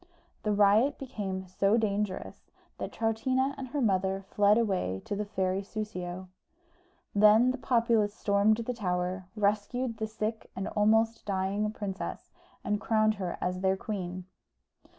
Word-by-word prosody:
The 210 - 0
riot 210 +7 +4
became 195 -8 -4
so 195 +4 +2
dangerous 210 -3 -2 0.3
that - - -4
Troutina 260 +5 0
and 270 -2 -6
her 280 +3 -2
mother 195 -3 +1
fled 205 +1 +4
away 185 - 0
to 205 - -3
the 210 +1 -2
fairy 190 -2 -1
Soussio. 190 -3 -5 0.9
Then 215 +4 +6
the 260 - -5
populace 230 -4 +2
stormed 205 0 +3
the 235 +2 -3
tower, 180 -3 -2
rescued 215 +4 0
the 220 -1 -2
sick 220 0 -4
and 190 - -3
almost 225 +2 +2
dying 200 +2 0
princess, 200 -3 -5 0.3
and 210 0 -1
crowned 215 -1 +3
her 180 -2 -3
as 180 0 -1
their 190 0 +1
queen. 185 -3 -5
210 Hz, 140 wpm, -29 LUFS, 190-225 Hz, 0.9 s, Then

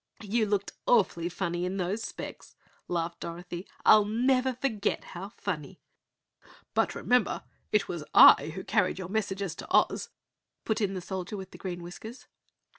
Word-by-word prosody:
"You 215 +1 +1
looked 200 -1 0 0.2
awfully 185 -7 +3
funny 175 -1 -2
in 185 +2 -2
those 190 +4 -1
specs!" - - -8 0.3
laughed 170 -1 -2
Dorothy. 175 +2 -6 0.2
"I'll 215 -1 +8
never 255 +4 +2
forget 225 -5 -1
how 190 +3 -8
funny!" 180 -4 -5 0.9
"But - - +1
remember, 250 -4 +1 0.3
it 210 -1 +2
was 170 -3 -4
I 160 - +8
who 190 - -5
carried 205 -5 +1
your 185 -2 -6
messages 200 -3 -2
to - - -8
Oz," - - +2 0.6
put 220 0 0
in 195 -2 0
the 185 - -4
Soldier 190 +2 -5
with 190 -1 -8
Green 175 -2 -6
Whiskers. 220 +8 -9
195 Hz, 150 wpm, -29 LUFS, 175-215 Hz, 0.9 s, I'll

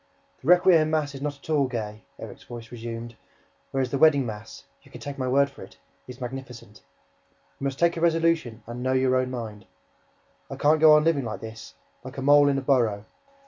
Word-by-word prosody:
"The 130 - -10
requiem 175 -3 +5
mass 155 -2 -1
is 135 - -9
not 145 -1 -3
at 140 - -18
all 145 -3 +2
gay," 110 -4 -5 0.2
Erik's - - -10
voice 115 -2 -10
resumed, 115 0 -7 0.5
"whereas 130 -2 -2
the 140 - -1
wedding 140 -4 +5
mass 110 -1 -8 0.2
you - - -21
can - - -11
take 140 -1 -7
my 130 - -1
word 140 +2 +3
for 140 - -15
it - - -12 0.3
is 125 0 -10
magnificent! 125 -4 -8 0.8
You 140 - -4
must 135 -1 -2
take 170 +2 +2
a 165 - -5
resolution 165 -9 +1
and 120 +2 -7
know 130 +1 0
your 130 0 +2
own 130 0 +1
mind! 110 -5 -7 0.8
I - - -6
can't 155 +2 +3
go 155 -1 +8
on 150 - +4
living 155 -4 +1
like 110 - -5
this, 110 0 -10 0.3
like 130 +2 -10
a 135 - -4
mole 145 +1 +6
in 140 - +1
a - - -1
burrow! 115 -7 +1
130 Hz, 210 wpm, -25 LUFS, 120-145 Hz, 0.8 s, go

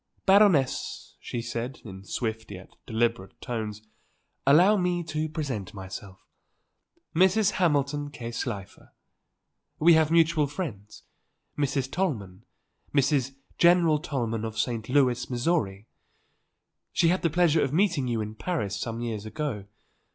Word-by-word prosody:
"Baroness," 190 -9 +3
she 120 -1 -5
said, 120 +2 -4
in 95 -2 -9
swift 110 -1 -3
yet 95 -2 -11
deliberate 115 -4 -1
tones; 110 -3 -5 0.6
"allow 175 +9 +6
me 180 -2 0
to 155 0 -3
present 130 - -4
myself; 95 0 -9 0.9
Mrs. 190 +4 +4
Hamilton 145 -4 0
K. 120 -5 -7
Slifer. 105 -5 -6 0.8
We 170 +2 +6
have 160 -1 +4
mutual 165 -2 +3
friends; 115 - -7 0.5
Mrs. 135 -2 -1
Tollman, 110 - -3 0.5
Mrs. 135 -2 +2 0.2
General 170 -3 +5
Tollman 120 -8 -3
of 110 0 -5
St. 110 0 -2
Louis, 125 -3 +2
Missouri. 120 - -1 1.1
She 165 - +3
had 185 +2 +1
the 170 - +2
pleasure 165 -1 +3
of 135 - 0
meeting 165 -5 +1
you 115 -2 -1
in 105 0 -5
Paris 110 - -3
some 115 +2 -4
years 110 -3 -4
ago. 130 -6 -4
135 Hz, 125 wpm, -27 LUFS, 110-165 Hz, 1.1 s, allow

